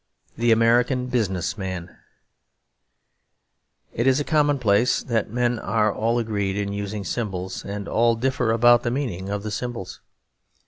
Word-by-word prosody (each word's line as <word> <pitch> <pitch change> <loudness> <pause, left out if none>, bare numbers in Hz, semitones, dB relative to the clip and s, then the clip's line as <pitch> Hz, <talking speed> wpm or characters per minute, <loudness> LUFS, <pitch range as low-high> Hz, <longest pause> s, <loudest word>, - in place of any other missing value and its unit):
The 120 +1 +2
American 120 +3 +3
Business 105 -4 -1
Man 95 -2 -5 2.0
It 120 +3 0
is 130 +1 +4
a - - 0
commonplace 130 -8 +2
that 115 -3 -1
men 120 +1 0
are 110 -2 +1
all 115 +2 0
agreed 100 -4 -1
in 100 -1 -2
using 100 0 -4
symbols, 95 -5 -4
and 100 0 -5
all 115 +1 +2
differ 125 -1 0
about 120 +1 +5
the 120 - -1
meaning 115 -8 -3
of 100 0 -3
the 110 - -4
symbols. 115 -5 -5
115 Hz, 140 wpm, -23 LUFS, 100-120 Hz, 2.0 s, about